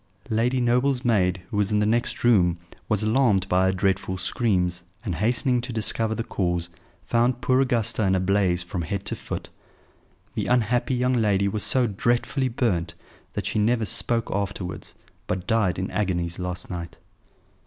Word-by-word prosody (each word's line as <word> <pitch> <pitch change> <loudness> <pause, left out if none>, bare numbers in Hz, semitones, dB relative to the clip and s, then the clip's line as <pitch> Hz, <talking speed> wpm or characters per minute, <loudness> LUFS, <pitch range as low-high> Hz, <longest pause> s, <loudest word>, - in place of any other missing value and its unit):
Lady 120 +4 +2
Noble's 125 +2 +1
maid, 95 -6 +2
who 105 - -2
was 105 0 +1
in 105 - +2
the 105 - +2
next 115 +3 0
room, 90 -8 +4 0.3
was 110 -1 +1
alarmed 110 -4 +3
by 95 +1 +3
her - - +3
dreadful 95 0 0
screams, 90 -3 0 0.2
and, 95 - -1
hastening 120 - +1
to 125 +1 -6
discover 110 0 +1
the 115 - -2
cause, 85 -5 -2 0.3
found 120 +6 +1
poor 130 +1 +2
Augusta 120 -5 0
in 95 - +3
a - - +2
blaze 95 -2 +1
from 90 0 -4
head 95 +4 -3
to - - -2
foot. - - -6 0.8
The - - -2
unhappy 125 +1 +2
young 125 +1 +1
lady 100 -4 +2
was 105 +2 -2
so 125 +5 +2
dreadfully 120 +4 0
burnt 90 -9 -1 0.4
that - - -3
she - - -1
never 115 +1 +2
spoke 115 +2 -1
afterwards, 95 -2 -4 0.3
but 90 -1 -2
died 110 -6 +1
in 95 0 -3
agonies 85 -4 -1
last 90 0 -5
night." 85 -1 -6
105 Hz, 170 wpm, -25 LUFS, 95-120 Hz, 0.8 s, room